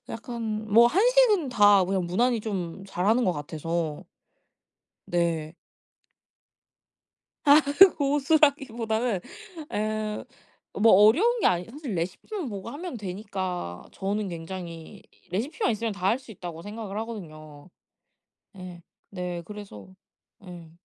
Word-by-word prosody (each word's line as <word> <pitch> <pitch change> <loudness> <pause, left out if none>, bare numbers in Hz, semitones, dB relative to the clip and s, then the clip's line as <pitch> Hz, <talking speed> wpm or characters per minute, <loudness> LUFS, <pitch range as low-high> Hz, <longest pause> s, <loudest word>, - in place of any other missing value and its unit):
약간 225 -2 -5
뭐 235 +2 +8
한식은 425 - +4
다 205 -4 +5
그냥 185 -1 -1
무난히 235 +7 +1
좀 195 -4 -5
잘하는 205 +6 +1
것 185 - +2
같아서. 160 +1 -4 1.0
네. 165 -2 -1 2.5
고수라기보다는 275 - +1 0.5
예 215 0 -2 0.5
뭐 225 +2 +4
어려운 305 - +5
게 - - +3
아니 175 0 0
사실 250 - -6
레시피만 250 - -4
보고 200 0 -6
하면 325 +2 -6
되니까 185 - -5
저는 200 +1 -3
굉장히 170 -1 -8 0.3
레시피만 255 - -1
있으면 225 +1 -2
다 190 -2 -3
할 220 - +3
수 250 - -15
있다고 175 -5 -8
생각을 205 0 -7
하거든요. 155 -9 -9 0.8
네. 180 -3 -10 0.3
네. 180 -2 -4
그래서 195 - -10 0.5
네. 175 -4 -11
205 Hz, 230 characters per minute, -26 LUFS, 175-235 Hz, 2.5 s, 뭐